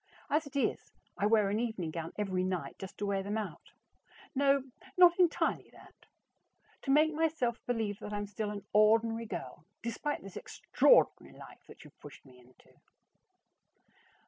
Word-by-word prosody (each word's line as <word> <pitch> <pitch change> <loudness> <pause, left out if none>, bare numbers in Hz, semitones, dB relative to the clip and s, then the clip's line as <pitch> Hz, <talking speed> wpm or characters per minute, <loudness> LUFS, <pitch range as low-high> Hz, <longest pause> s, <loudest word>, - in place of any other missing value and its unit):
As 300 0 +1
it 285 - -14
is, 280 - -1 0.2
I 205 - +1
wear 210 -2 +3
an 210 - 0
evening 220 -9 -3
gown 165 0 -5
every 190 -3 -1
night 180 -7 -3
just 190 - -9
to 205 - -3
wear 200 -1 0
them 205 +3 -3
out 215 - -6 0.6
no, 275 -1 +3 0.3
not 355 0 +7
entirely 350 -3 +1
that; - - -16 0.9
to - - -7
make 305 +3 +4
myself 300 -7 -1
believe 220 -4 -1
that 210 - -7
I'm 205 0 -3
still 210 +1 -4
an 205 -1 -7
ordinary 225 +2 +3
girl 130 -5 -7 0.2
despite 265 +5 -3
this 195 -1 -9
extraordinary - - +2
life - - -13
that - - -14
you - - -15
have - - -48
pushed - - -13
me 130 -2 -17
into. 125 +1 -23
215 Hz, 165 wpm, -32 LUFS, 195-275 Hz, 0.9 s, not